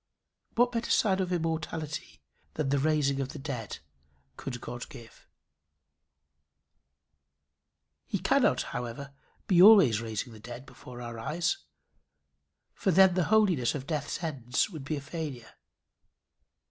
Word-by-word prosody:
What 245 +1 +4
better 235 -1 -2
sign 195 -6 +3
of 185 -1 -1
immortality 160 - -3 0.3
than 150 -3 -1
the 140 0 +2
raising 140 -2 +1
of 135 - -4
the - - -7
dead 130 - -5 0.6
could 125 - -6
God 120 0 -7
give? 115 -1 -14 2.8
He - - -1
cannot, - - +2
however, 125 +3 -5 0.3
be 180 -3 +4
always 185 - +8
raising 115 +1 -4
the 110 - -12
dead 120 +3 -9
before 125 -3 -11
our 115 -1 -7
eyes; 165 - -1 1.2
for - - -1
then 190 +1 +6
the 180 -2 +1
holiness 180 - +3
of 135 -2 -5
death's 150 +2 -3
ends 135 - -1
would 155 -6 -8
be 155 - -2
a - - -5
failure. 140 -6 -6
145 Hz, 130 wpm, -29 LUFS, 125-175 Hz, 2.8 s, always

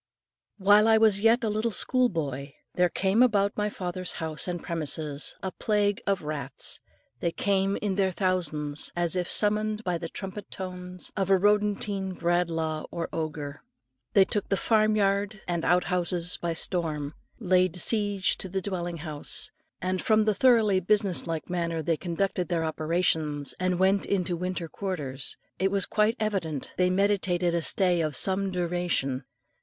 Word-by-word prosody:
While 205 +2 +5
I 220 0 +6
was 215 -3 +4
yet 230 +3 +4
a - - +1
little 215 +2 0
school 250 +3 +1
boy, 140 - -4 0.2
there 180 0 +2
came 195 +6 +1
about 205 -5 +3
my 210 0 0
father's 185 -2 -4
house 160 0 -2
and 175 -2 -4
premises 155 -3 -1
a 190 - -2
plague 205 -1 0
of 195 -4 0
rats. 140 -3 -2 0.4
They 170 - 0
came 195 +1 0
in 205 -2 0
their 195 -1 +3
thousands, 155 -6 -1
as 175 0 +3
if 180 -1 -1
summoned 215 +1 +2
by 180 -4 -1
the 165 - -5
trumpet 195 +1 -7
tones 180 -1 -6
of 195 -2 -1
a 195 - +6
rodentine 205 -1 +1
Bradlaugh 165 -2 -1
or 170 -1 -4
Odger. 150 -3 -4 0.5
They 195 - +6
took 205 +1 -2
the 195 - +1
farm 215 0 +2
yard 200 +1 0
and 170 -2 -1
outhouses 175 0 +1
by 170 -1 -2
storm, 155 -4 -2 0.3
laid 185 -4 +2
siege 205 +1 +1
to 190 - -3
the 190 +1 -1
dwelling 175 -3 -4
house, 150 -2 -3 0.3
and, 185 0 -1
from 215 -1 +3
the 215 - +3
thoroughly 220 -3 +4
business 195 -1 +1
like 165 -2 -3
manner 170 -2 -2
they 165 +2 +1
conducted 180 +2 -2
their 170 -2 0
operations, 155 -2 -1
and 185 -1 0
went 190 +2 +2
into 180 -3 0
winter 180 0 -3
quarters, 150 -8 0 0.2
it 190 - +2
was 195 -1 +1
quite 215 +2 +1
evident 190 -10 -2
they 180 0 +2
meditated 185 -2 +1
a 170 - +1
stay 180 0 +2
of 155 -3 -1
some 195 +4 +3
duration. 175 -7 -1
185 Hz, 160 wpm, -27 LUFS, 165-200 Hz, 0.5 s, I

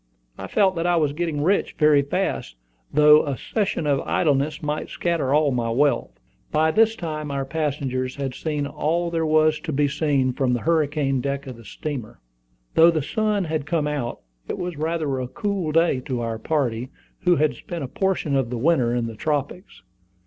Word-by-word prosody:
I - - -7
felt 195 -3 +2
that 165 +1 0
I 175 - +3
was 150 -4 +1
getting 155 -2 -2
rich 195 +5 +1
very 150 -2 +5
fast, 100 - -2 0.4
though 150 +1 +6
a 140 -3 -3
season 200 -7 -2
of 140 -2 +2
idleness 150 0 0
might 150 0 -3
scatter 170 -6 -1
all 150 0 +3
my 120 -2 -1
wealth. 140 +5 +1 0.3
By 160 +1 +3
this 225 +4 +3
time 155 -5 -4
our 140 -1 -2
passengers 135 -4 -2
had 135 -2 -3
seen 150 0 -2
all 170 +4 -1
there 165 -1 0
was 155 0 +3
to 165 - -5
be 145 0 +2
seen 140 -3 +1
from 125 -1 0
the 120 - -1
hurricane 150 -4 +1
deck 140 +1 -3
of 130 -2 -7
the 115 -1 -15
steamer. 130 0 -6 0.5
Though 165 +1 +7
the 160 -4 0
sun 210 +4 0
had 155 -3 -3
come 160 -3 0
out, 145 -5 -3 0.3
it - - -3
was 180 -1 -4
rather 155 -3 -1
a 125 - -3
cool 195 +2 -2
day 165 -4 +3
to 130 -1 -4
our 115 -1 -3
party, 130 -4 -1 0.3
who 180 -1 +3
had 155 -1 +2
spent 170 -4 -7
a - - -3
portion 180 -2 -1
of 135 -3 +1
the 125 - -3
winter 125 -3 +2
in 120 -1 0
the 115 - -5
tropics. 150 - -3
150 Hz, 190 wpm, -23 LUFS, 135-165 Hz, 0.5 s, Though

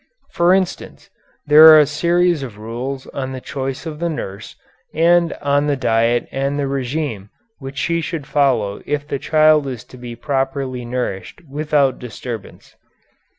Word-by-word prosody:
For 175 +1 +3
instance, 190 -1 -2 0.3
there 150 +2 +8
are 155 -1 +10
a 150 - +5
series 170 +2 +1
of 120 -6 -7
rules 125 +5 -5
on 130 -1 -5
the 130 - -5
choice 135 +3 -5
of 155 -2 -6
the 170 0 -1
nurse, 100 -10 -6 0.4
and 170 +1 +3
on 145 +1 +2
the 145 - +1
diet 120 -2 +1
and 140 +1 -2
the 145 - -1
régime 135 -5 -3 0.3
which 135 0 -9
she 170 +2 0
should 160 -3 -5
follow 130 -9 +1
if 145 0 -2
the 140 - -3
child 155 -1 +3
is 125 -5 -6
to 125 - -15
be 120 -1 -8
properly 135 -1 -2
nourished 120 - -4
without 145 -2 0
disturbance. 115 -2 -8
140 Hz, 155 wpm, -19 LUFS, 125-155 Hz, 0.4 s, are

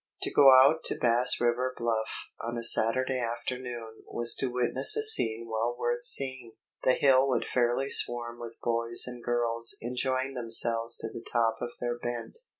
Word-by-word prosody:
To - - -1
go 140 -2 +6
out 135 +5 +4
to - - -2
Bass 125 +1 +3
River 125 +2 -2
Bluff 115 -2 -3 0.3
on 120 +1 -5
a 115 - -5
Saturday 130 +3 +1
afternoon 120 -1 -7
was 120 0 +1
to 135 - -2
witness 125 - +4
a 440 - 0
scene 115 - +4
well 115 +2 -3
worth 480 +1 -3
seeing. 130 - 0 0.3
The 130 - +2
hill 135 -1 +2
would 125 -3 -2
fairly 125 +2 -1
swarm 120 -2 -1
with 115 -1 -9
boys 115 0 +2
and 125 -1 -9
girls 115 -1 -1
enjoying 130 +2 -3
themselves 115 -1 +1
to - - -6
the 115 - -9
top 115 -1 0
of 120 0 -6
their 120 0 -4
bent. 120 - -6
120 Hz, 170 wpm, -27 LUFS, 115-130 Hz, 0.3 s, go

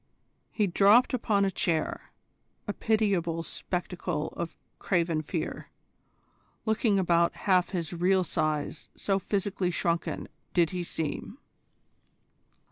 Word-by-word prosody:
He 210 - +1
dropped 200 +8 +5
upon 210 -5 +2
a 195 - +1
chair, 165 -4 -1 0.6
a 205 - -1
pitiable 195 -8 +1
spectacle 175 -3 -3
of 170 -1 -6 0.2
craven 170 -4 +1
fear, 155 +1 -4 1.0
looking 220 -1 +2
about 170 -2 +3
half 185 -3 +4
his 175 -3 -3
real 185 +2 +3
size 155 -3 -2
so 195 -1 0
physically 195 -2 -1
shrunken 170 -1 -1 0.3
did 170 -2 +4
he 180 -1 -2
seem. 165 - -4
180 Hz, 110 wpm, -28 LUFS, 170-200 Hz, 1.0 s, dropped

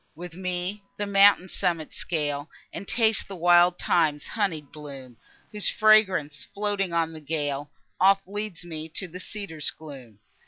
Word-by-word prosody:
With 175 +1 -9
me 185 +2 -3 0.2
the 205 - -2
mountain's 200 -2 +4
summit 165 -3 -1
scale, 145 -3 -3 0.2
And 200 - -7
taste 225 -3 +2
the 195 - -7
wild 175 0 +5
thyme's 155 -4 +1
honied 170 -9 -2
bloom, 135 -5 -10 0.3
Whose 210 -1 +2
fragrance, 190 -10 +3
floating 200 -2 -1
on 165 -1 0
the 155 - -9
gale, 145 -2 -2 0.3
Oft 195 +1 +4
leads 205 -4 -5
me 160 -1 -7
to 180 +4 -5
the 180 +2 -9
cedar's 185 -7 -5
gloom. 135 -9 -11
175 Hz, 150 wpm, -26 LUFS, 150-195 Hz, 0.3 s, wild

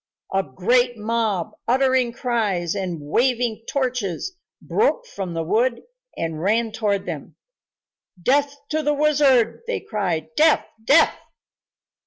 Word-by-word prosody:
A 195 - +3
great 240 - +1
mob, 215 -4 -1 0.2
uttering 260 0 +3
cries 220 -9 -1
and 185 -3 -3
waving 235 - 0
torches, 255 - -2 0.2
broke 485 +2 0
from 190 - -6
the 165 - -1
wood 235 +8 +1 0.3
and 160 -1 -3
ran 220 +4 +1
toward 205 -3 -1
them. 160 -2 -6 0.8
"Death 280 +8 +2
to 310 0 0
the 295 0 +1
wizard!" 285 - +3
they 485 - -1
cried. 175 -8 -2
"Death! 315 0 +4 0.2
Death!" 285 +8 +5
230 Hz, 120 wpm, -22 LUFS, 185-265 Hz, 0.8 s, Death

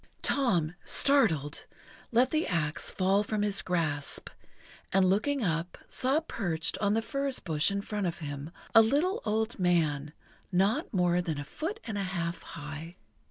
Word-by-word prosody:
Tom, 180 - +2
startled, 170 - +2 0.4
let 245 +2 +4
the 315 +1 +1
axe 155 -4 -1
fall 195 +2 +2
from 210 0 -1
his 205 -1 +1
grasp, 155 -5 -2 0.6
and, 190 0 +4
looking 225 +8 +2
up, 170 -1 -1
saw 265 +4 +2
perched 175 - -2
on 205 +1 +2
the 225 - +1
furze 275 +1 -1
bush 155 -3 +1
in 200 0 -2
front 205 -3 -2
of 170 - -3
him 145 -1 -6 0.2
a 225 - +10
little 310 - +2
old 220 +2 -1
man, 155 -5 +1 0.4
not 200 - +2
more 180 -2 +2
than 160 -4 -3
a - - -3
foot 330 - -4
and 210 -3 -4
a - - 0
half 170 0 -2
high. 155 +2 -8
190 Hz, 160 wpm, -30 LUFS, 165-225 Hz, 0.6 s, a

